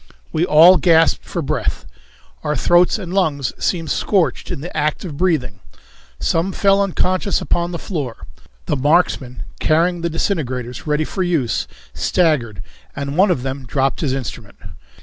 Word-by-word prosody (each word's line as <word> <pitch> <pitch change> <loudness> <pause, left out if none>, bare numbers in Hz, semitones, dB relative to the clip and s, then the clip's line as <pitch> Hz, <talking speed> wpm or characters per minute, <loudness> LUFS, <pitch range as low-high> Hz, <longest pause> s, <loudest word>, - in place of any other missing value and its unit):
We 165 +3 +1
all 170 +5 +7
gasped 165 -2 +3
for - - -4
breath. - - -2 0.6
Our 150 -1 -1
throats 175 - +3
and 185 -4 -7
lungs 150 -9 0
seemed 165 -5 -1
scorched 190 +5 0
in - - -4
the 175 - -8
act 150 +4 -1
of 155 -5 -6
breathing. 140 - 0 0.6
Some 170 +4 0
fell 195 0 +3
unconscious 185 0 0
upon 175 0 -1
the 170 - -3
floor. 145 - -5 0.4
The - - 0
marksmen, 140 -3 +1 0.2
carrying 170 +2 +1
the 170 - -1
disintegrators 130 - -3
ready 150 +1 +1
for 190 - -4
use, 165 -10 0 0.3
staggered, 120 - 0 0.3
and 140 0 -4
one 190 +4 +4
of 140 -9 0
them 135 -1 -5
dropped 135 +3 0
his 140 -5 0
instrument. 125 -5 -6
160 Hz, 150 wpm, -19 LUFS, 135-180 Hz, 0.6 s, all